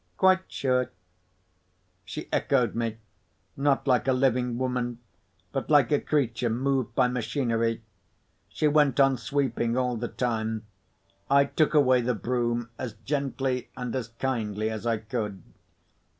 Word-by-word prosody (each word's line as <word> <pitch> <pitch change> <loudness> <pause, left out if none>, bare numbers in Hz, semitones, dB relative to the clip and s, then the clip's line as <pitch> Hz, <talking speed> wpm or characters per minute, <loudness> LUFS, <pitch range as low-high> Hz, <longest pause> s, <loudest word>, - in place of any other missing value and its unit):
"Quite 185 0 +3
sure." 125 -2 +1 1.2
She 155 +9 -6
echoed 125 -6 +2
me, 115 -1 -2 0.6
not 140 0 +1
like 130 0 +3
a 130 - +4
living 125 -2 +1
woman, 125 -2 -1 0.5
but - - -3
like 145 -6 +5
a 145 - +4
creature 125 -5 0
moved 130 0 0
by 125 - +4
machinery. 115 -2 -1 0.7
She 155 - +1
went 145 -3 +3
on 135 -1 +5
sweeping 125 -2 -1
all 125 -2 0
the 120 +2 -3
time. 110 -3 -2 0.6
I 140 0 +5
took 155 +2 +1
away 130 -4 +5
the 120 0 0
broom 120 0 -1
as 125 -4 -4
gently 135 -2 -2
and 125 -1 -4
as 125 -4 -2
kindly 110 -3 -2
as 110 +1 -4
I 115 -1 +2
could. 105 -4 -4
125 Hz, 135 wpm, -27 LUFS, 115-135 Hz, 1.2 s, like